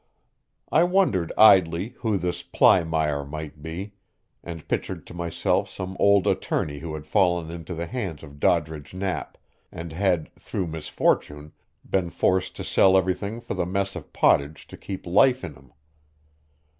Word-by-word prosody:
I 160 Hz, -, +5 dB
wondered 175 Hz, -, +2 dB
idly 95 Hz, -2 st, +6 dB
who 110 Hz, -4 st, 0 dB
this 90 Hz, -1 st, -2 dB
Plymire 80 Hz, -3 st, +2 dB
might 75 Hz, +1 st, -8 dB
be, 90 Hz, +6 st, -6 dB, 0.5 s
and 85 Hz, -2 st, -8 dB
pictured -, -, -3 dB
to -, -, -12 dB
myself 85 Hz, -1 st, -1 dB
some 95 Hz, +1 st, -6 dB
old 100 Hz, -2 st, +4 dB
attorney 75 Hz, -1 st, -1 dB
who 80 Hz, +1 st, -6 dB
had 75 Hz, -1 st, -8 dB
fallen 85 Hz, -2 st, +1 dB
into 85 Hz, +1 st, -7 dB
the 85 Hz, +1 st, -3 dB
hands 95 Hz, -, -5 dB
of 70 Hz, -2 st, -12 dB
Doddridge 80 Hz, 0 st, 0 dB
Knapp, 95 Hz, -2 st, -3 dB, 0.3 s
and 85 Hz, -1 st, -7 dB
had, 90 Hz, -2 st, 0 dB
through 95 Hz, -, -3 dB
misfortune, 75 Hz, -2 st, -1 dB, 0.4 s
been 95 Hz, -3 st, 0 dB
forced 90 Hz, +1 st, 0 dB
to -, -, -6 dB
sell 95 Hz, 0 st, +4 dB
everything 95 Hz, +4 st, -1 dB
for -, -, -6 dB
the 90 Hz, -2 st, -2 dB
mess 100 Hz, +1 st, -2 dB
of -, -, -9 dB
pottage 70 Hz, +2 st, +2 dB
to -, -, -9 dB
keep 95 Hz, -2 st, -7 dB
life 125 Hz, +9 st, +4 dB
in 80 Hz, -, -6 dB
him. 65 Hz, -2 st, -19 dB
85 Hz, 155 wpm, -25 LUFS, 80-95 Hz, 0.5 s, idly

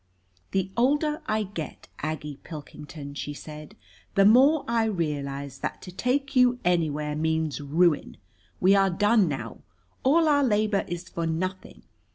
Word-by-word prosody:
"] 90 Hz, -1 st, -36 dB
"The 190 Hz, 0 st, -1 dB
older 295 Hz, +5 st, +1 dB
I 215 Hz, 0 st, +1 dB
get, 185 Hz, -6 st, -7 dB
Aggie 150 Hz, -2 st, -4 dB
Pilkington," 150 Hz, -2 st, -9 dB
she 145 Hz, 0 st, -5 dB
said, 150 Hz, +6 st, -10 dB, 0.4 s
"the 195 Hz, -1 st, +5 dB
more 270 Hz, +8 st, +6 dB
I 230 Hz, -1 st, +2 dB
realize 140 Hz, -8 st, -3 dB
that -, -, -4 dB
to 180 Hz, -, -8 dB
take 270 Hz, +8 st, -1 dB
you 250 Hz, -1 st, +5 dB
anywhere 150 Hz, -4 st, +1 dB
means 160 Hz, -3 st, -1 dB
ruin. 155 Hz, +2 st, +1 dB, 0.4 s
We 190 Hz, +2 st, +5 dB
are 195 Hz, -1 st, +4 dB
done 205 Hz, +2 st, +3 dB
now. 125 Hz, -6 st, -5 dB, 0.4 s
All 315 Hz, +5 st, +4 dB
our 285 Hz, -1 st, +4 dB
labor 215 Hz, -4 st, +1 dB
is 175 Hz, 0 st, -5 dB
for 170 Hz, -1 st, -3 dB
nothing. 185 Hz, +4 st, -4 dB
180 Hz, 150 wpm, -26 LUFS, 150-225 Hz, 0.4 s, more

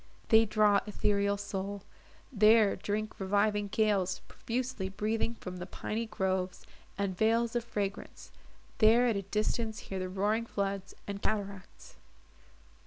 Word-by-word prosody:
———they 225 Hz, 0 st, +7 dB
draw 210 Hz, -1 st, +4 dB
Ethereal 200 Hz, -1 st, +1 dB
soul, 200 Hz, 0 st, -4 dB, 0.5 s
there 215 Hz, -1 st, +5 dB
drink 215 Hz, +1 st, -3 dB
reviving 205 Hz, +1 st, +1 dB
gales 200 Hz, -3 st, +1 dB
Profusely 240 Hz, -5 st, -3 dB
breathing 220 Hz, +4 st, -1 dB
from 180 Hz, -4 st, -7 dB
the 180 Hz, +1 st, -6 dB
piney 225 Hz, +4 st, -3 dB
groves, 190 Hz, -3 st, -2 dB, 0.3 s
And 200 Hz, -2 st, -1 dB
vales 230 Hz, +3 st, +2 dB
of 240 Hz, -, +1 dB
fragrance; 200 Hz, -4 st, -5 dB, 0.5 s
there 230 Hz, +3 st, +6 dB
at 235 Hz, -3 st, +2 dB
a 200 Hz, -, -1 dB
distance 215 Hz, +3 st, -1 dB
hear 190 Hz, -, -5 dB
The 185 Hz, 0 st, -3 dB
roaring 210 Hz, +5 st, 0 dB
floods, 195 Hz, -2 st, -3 dB
and 200 Hz, 0 st, -5 dB
cataracts. 200 Hz, -, -4 dB
205 Hz, 130 wpm, -31 LUFS, 195-220 Hz, 0.5 s, they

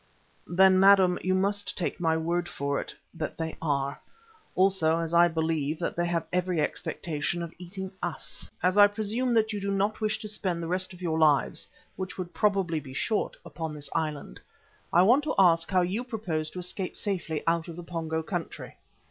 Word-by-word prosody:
"Then, 185 Hz, +2 st, +5 dB
madam, 190 Hz, -2 st, +6 dB
you 185 Hz, 0 st, +1 dB
must 200 Hz, +1 st, 0 dB
take 180 Hz, -, -2 dB
my 160 Hz, -2 st, +2 dB
word 175 Hz, +2 st, -1 dB
for 140 Hz, 0 st, -2 dB
it -, -, -10 dB, 0.2 s
that 160 Hz, -2 st, -5 dB
they 160 Hz, -1 st, -3 dB
are; 140 Hz, -2 st, -1 dB, 0.6 s
also, 185 Hz, -4 st, +3 dB
as 165 Hz, 0 st, -3 dB
I 170 Hz, +1 st, +7 dB
believe, 160 Hz, -2 st, -1 dB
that 170 Hz, -, -3 dB
they 175 Hz, 0 st, 0 dB
have 170 Hz, -1 st, -1 dB
every 180 Hz, -2 st, +1 dB
expectation 160 Hz, +2 st, -2 dB
of 170 Hz, -, -7 dB
eating 190 Hz, +1 st, -6 dB
us. 175 Hz, -2 st, -5 dB
Now, 180 Hz, -, +5 dB
as 185 Hz, -, -3 dB
I 205 Hz, -, +10 dB
presume 220 Hz, +4 st, -2 dB
that 220 Hz, -1 st, +2 dB
you 205 Hz, -, -3 dB
do 200 Hz, -, -2 dB
not 200 Hz, +3 st, 0 dB
wish 215 Hz, 0 st, +1 dB
to 215 Hz, -, -5 dB
spend 185 Hz, -5 st, -2 dB
the -, -, -3 dB
rest 185 Hz, +2 st, -1 dB
of 180 Hz, 0 st, -11 dB
your 160 Hz, -2 st, 0 dB
lives, 150 Hz, -3 st, +3 dB, 0.3 s
which 190 Hz, 0 st, -5 dB
would 180 Hz, -2 st, -5 dB
probably 195 Hz, -6 st, +1 dB
be 130 Hz, -3 st, -10 dB
short, 215 Hz, -, -1 dB
upon 160 Hz, -2 st, -5 dB
this 145 Hz, -1 st, -5 dB
island, 150 Hz, -, -3 dB, 0.5 s
I 175 Hz, -, +6 dB
want 250 Hz, +9 st, +5 dB
to -, -, -1 dB
ask 170 Hz, -3 st, +5 dB
how 185 Hz, -2 st, +3 dB
you 190 Hz, +7 st, -1 dB
propose 185 Hz, -11 st, -3 dB
to 180 Hz, -, -7 dB
escape 180 Hz, +1 st, -4 dB
safely 175 Hz, -7 st, -2 dB
out 165 Hz, -1 st, +1 dB
of 170 Hz, -, -7 dB
the 175 Hz, -, -8 dB
Pongo 160 Hz, -1 st, -3 dB
country?" 175 Hz, 0 st, -5 dB
175 Hz, 200 wpm, -28 LUFS, 160-195 Hz, 0.6 s, I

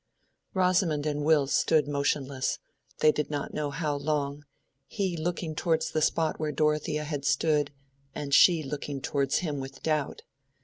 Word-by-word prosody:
Rosamond 180 Hz, -5 st, +2 dB
and 150 Hz, -1 st, -1 dB
Will 150 Hz, -2 st, +4 dB
stood 150 Hz, +2 st, +2 dB
motionless—they 140 Hz, -, -1 dB
did 150 Hz, 0 st, -2 dB
not 145 Hz, -1 st, -4 dB
know 150 Hz, -1 st, -2 dB
how 145 Hz, +1 st, -2 dB
long—he 145 Hz, +3 st, -4 dB
looking 165 Hz, 0 st, -3 dB
towards 160 Hz, 0 st, 0 dB
the 155 Hz, -, 0 dB
spot 160 Hz, +1 st, +1 dB
where 155 Hz, -1 st, -1 dB
Dorothea 150 Hz, 0 st, 0 dB
had 145 Hz, -2 st, -4 dB
stood, 150 Hz, 0 st, +2 dB, 0.5 s
and 145 Hz, -2 st, -4 dB
she 165 Hz, +1 st, +6 dB
looking 140 Hz, 0 st, -4 dB
towards 140 Hz, 0 st, 0 dB
him 145 Hz, -3 st, -2 dB
with 135 Hz, 0 st, -8 dB
doubt. 155 Hz, -3 st, -1 dB
150 Hz, 140 wpm, -28 LUFS, 140-155 Hz, 0.5 s, she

